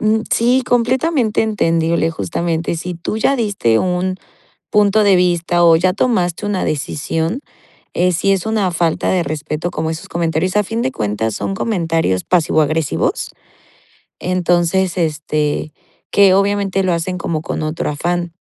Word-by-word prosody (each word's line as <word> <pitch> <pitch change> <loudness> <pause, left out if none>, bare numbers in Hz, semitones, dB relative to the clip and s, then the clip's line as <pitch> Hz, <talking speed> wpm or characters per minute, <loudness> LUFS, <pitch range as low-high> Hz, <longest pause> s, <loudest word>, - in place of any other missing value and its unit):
Mm, 215 +1 +2
sí, 245 +3 +3
completamente 245 0 +1
entendible, 165 -6 +1
justamente. 165 - -2
Si 175 +2 -5
tú 170 +5 -4
ya 275 +5 +2
diste 200 - +1
un 185 0 -1 0.5
punto 210 +1 +3
de 200 -2 +5
vista 175 -1 +2
o 165 -1 +7
ya 185 +3 +2
tomaste 190 -4 0
una 205 -2 -1
decisión, 160 - -2 0.5
eh, 180 +1 +2
sí 180 +4 +1
es 190 0 -1
una 215 -4 +1
falta 170 -2 0
de 185 -2 +2
respeto 155 +2 -3
como 160 0 -2
esos 160 0 -6
comentarios, 170 +2 -1
a 210 - +3
fin 225 +4 -3
de 130 - -1
cuentas, 105 0 -2
son 195 - -3
comentarios 165 - 0
pasivo 165 -3 +2
agresivos. 155 0 -1 0.9
Entonces, 180 0 +1
este, 150 -2 -1 0.4
que, 195 -2 +5
obviamente, 195 -1 +1
lo 185 -1 +1
hacen 170 +2 -2
como 160 -3 -3
con 160 - -4
otro 155 0 -2
afán. 175 +3 -2
175 Hz, 150 wpm, -17 LUFS, 160-200 Hz, 0.9 s, o